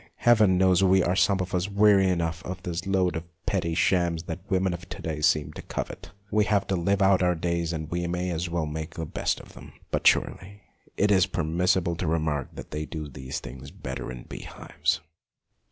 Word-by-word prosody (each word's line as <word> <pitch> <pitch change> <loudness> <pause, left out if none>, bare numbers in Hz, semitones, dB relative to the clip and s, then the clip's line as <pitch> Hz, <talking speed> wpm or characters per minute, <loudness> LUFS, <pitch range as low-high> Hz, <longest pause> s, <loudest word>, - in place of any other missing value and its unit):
Heaven 110 -6 +4
knows 95 0 +4
we 95 -1 +5
are 90 - +1
some 100 -1 +3
of 95 +1 -5
us 90 +2 0
weary 100 -1 +5
enough 85 -2 -1
of 90 0 -6
this 90 +1 -4
load 95 -4 +1
of 80 - -3 0.2
petty 90 -5 0
shams 85 -1 +2
that 85 +1 -6
the - - -20
women 95 -1 +2
of 85 +1 -8
to - - -7
day 75 -2 -4
seem 75 -1 +2
to - - -8
covet! - - -6 0.2
We 105 -1 +3
have 105 -2 +2
got - - -27
to 95 - +2
live 100 +3 +2
out 95 -1 +4
our 90 -1 +3
days, 85 0 -1
and 80 -2 -4
we 85 0 -1
may 90 +1 -2
as 85 +1 -2
well 85 -2 -1
make 80 +1 -5
the 80 - -3
best - - -1
of - - -14
them, - - -12 0.2
but - - +2
surely 100 +2 +1 0.3
it 105 +1 +3
is 95 -1 +4
permissible 85 0 +1
to 90 - -2
remark 80 -4 -1
that - - -9
they 75 0 -4
do 75 -2 -5
these 65 -2 -6
things 65 +1 -9
better - - -6
in 60 -1 -8
bee - - -8
hives. - - -2
90 Hz, 220 wpm, -26 LUFS, 80-95 Hz, 0.3 s, we